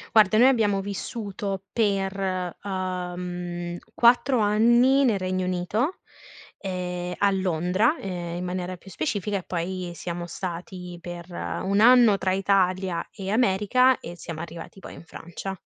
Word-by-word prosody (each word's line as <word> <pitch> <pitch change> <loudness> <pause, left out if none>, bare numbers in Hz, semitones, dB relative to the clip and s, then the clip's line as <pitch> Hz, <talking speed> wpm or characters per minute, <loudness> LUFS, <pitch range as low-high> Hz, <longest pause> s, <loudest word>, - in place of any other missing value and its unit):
Guarda, 215 -1 +6
noi 245 +3 +7
abbiamo 215 -6 +3
vissuto 200 -1 -4
per, 195 -4 0
uhm, 180 -2 -4 0.2
4 245 +2 +4
anni 235 +6 +4
nel 225 -7 +2
Regno 185 0 -1
Unito, 185 - -1 0.6
ehm, 180 -2 -4
a 200 - +3
Londra, 185 - +1
ehm, 175 -3 -4
in 180 - -4
maniera 180 0 -4
più 195 - -15
specifica, 195 +4 -2
e - - -11
poi 180 +1 -3
siamo 175 0 -5
stati 180 +1 -6
per 175 0 -8
1 195 +3 -1
anno 235 -3 +7
tra 190 -1 0
Italia 185 -2 +1
e 195 -2 -6
America, 235 +4 +3
e 175 - -8
siamo 165 -2 -7
arrivati 170 +3 -8
poi - - -10
in - - -11
Francia. 175 +4 -7
190 Hz, 135 wpm, -25 LUFS, 180-205 Hz, 0.6 s, noi